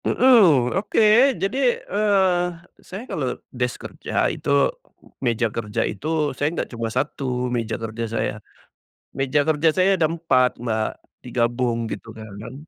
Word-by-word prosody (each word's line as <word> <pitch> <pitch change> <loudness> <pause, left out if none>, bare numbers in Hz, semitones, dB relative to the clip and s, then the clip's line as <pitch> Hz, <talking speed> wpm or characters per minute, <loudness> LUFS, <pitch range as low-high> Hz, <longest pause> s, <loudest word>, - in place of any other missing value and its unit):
Mhm. 185 - +5
Oke, 220 +5 +4
jadi, 250 +5 +1
eee, 195 -4 +2 0.4
saya 200 +6 -8
kalau 130 - -3 0.2
desk 125 -1 -3
kerja - - -1
itu, - - -6 0.7
meja 120 -2 +1
kerja 105 -2 -2
itu 155 -1 -1
saya 145 +3 0
nggak - - -2
cuma 115 -1 -3
1, 125 -1 -2
meja 115 -2 -2
kerja 115 0 -5
saya. 115 - -1 0.8
Meja 135 +2 +2
kerja 155 +1 +2
saya 190 +2 +3
ada 165 - +3
4 155 -7 +1
Mbak, 110 -2 -1 0.3
digabung 120 -1 -1
gitu 115 0 -7
kan 110 -1 -10
kan, 110 +4 -8
130 Hz, 135 wpm, -22 LUFS, 115-180 Hz, 0.8 s, Mhm